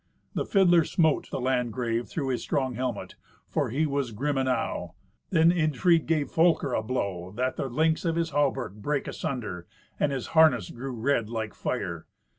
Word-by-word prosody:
The - - -2
fiddler 175 -4 +5
smote 160 -2 +1
the - - -3
Landgrave 120 -2 -1
through 140 -4 -3
his 125 - -1
strong 130 -2 -1
helmet, 125 +1 -3 0.3
for - - -1
he 145 +7 +1
was 140 -3 -1
grim 140 +7 -1
enow. 130 -10 -1 0.3
Then 165 -2 +5
Irnfried 165 0 +2
gave 155 -3 0
Folker 160 -5 +3
a - - +1
blow, 100 -6 -3
that 130 +2 -1
the 135 - -3
links 160 +5 +1
of 165 -2 0
his 165 -1 -1
hauberk 135 -7 0
brake 140 +7 -2
asunder, 120 - -4 0.3
and 145 - +2
his 135 -3 -3
harness 155 - +5
grew 130 +2 -6
red 115 -2 0
like 110 -2 -3
fire. - - -4
135 Hz, 170 wpm, -27 LUFS, 120-160 Hz, 0.3 s, fiddler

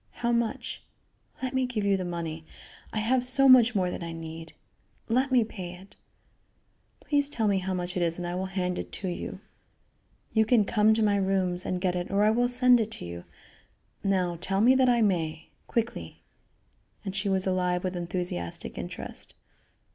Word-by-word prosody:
How 235 - +3
much? 235 -1 -2 0.6
Let 260 0 -2
me 260 -1 +1
give 230 -4 -2
you 200 -1 +3
the 190 - -2
money. 165 -2 -4 0.5
I - - -5
have 245 +4 +2
so 270 +2 +3
much 245 -2 +7
more 180 -2 +1
than - - -5
I 170 -1 -5
need. 165 0 -8 0.5
Let 255 +4 +1
me 250 -3 +5
pay 185 -5 -7
it. 190 +2 -15 1.1
Please 285 -1 +1
tell 225 -6 0
me 200 -2 +2
how 185 0 -2
much 180 0 -4
it 180 - 0
is 170 -1 0
and 175 - -4
I 175 - -3
will 185 +1 -2
hand 180 -1 -2
it - - -6
to 190 - -4
you. 175 - -5 0.9
You 220 - +4
can 220 -1 +3
come 215 +1 +3
to 225 - +1
my 205 -1 +3
rooms 190 -2 0
and 180 - -1
get 180 -1 0
it 175 0 -3
or 200 +1 +2
I 215 - +5
will 245 +2 +2
send 250 0 +5
it 220 -1 -1
to - - -7
you. 85 0 -8 0.8
Now 180 -3 0
tell 195 +1 +2
me 240 +5 +6
that 260 -1 +4
I 240 -2 +4
may. 160 -6 -1 0.2
Quickly." 235 0 -3 0.8
And 195 -1 -4
she 200 +1 0
was 190 -1 +2
alive 180 -1 0
with 185 -1 -2
enthusiastic 175 - -4
interest. - - -8
195 Hz, 195 wpm, -28 LUFS, 180-230 Hz, 1.1 s, much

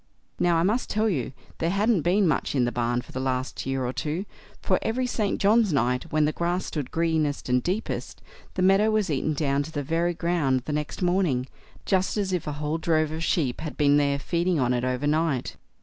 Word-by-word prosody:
Now, 175 -1 +3
I 165 - +2
must 215 +7 0
tell 215 +1 +1
you, 140 - -1 0.3
there 165 - +1
hadn't 205 +1 +2
been 185 +4 +3
much 150 -1 0
in 125 -3 +3
the 120 - -1
barn 120 0 0
for - - -15
the 130 - -4
last 130 0 -2
year 135 -1 -1
or 125 - -2
two, 160 +8 -3 0.3
for - - +1
every 250 +3 -1
St. 215 -5 -1
John's 215 0 +4
night, 125 +2 0
when 155 -1 +3
the 150 - +1
grass 175 +3 -1
stood 145 -5 -4
greenest 160 -5 0
and 125 0 +3
deepest, 190 - -3 0.4
the 185 - 0
meadow 195 +3 +5
was 215 -5 +1
eaten 150 +2 0
down 140 -1 +1
to 150 +2 -6
the 145 -2 -3
very 165 +4 0
ground 160 -6 +1
the 150 +4 -4
next 150 +4 -3
morning, 175 -8 +1 0.4
just 190 +1 +1
as 195 -2 -1
if 175 -4 -2
a 150 - -2
whole 150 +2 -2
drove 155 -2 +1
of 160 +1 -4
sheep 145 -7 0
had 155 - -6
been 145 -1 +4
there 140 -1 +2
feeding 170 +3 0
on 125 -1 +2
it 120 0 -1
over 130 +2 -1
night. 150 -3 0
160 Hz, 220 wpm, -26 LUFS, 140-180 Hz, 0.4 s, meadow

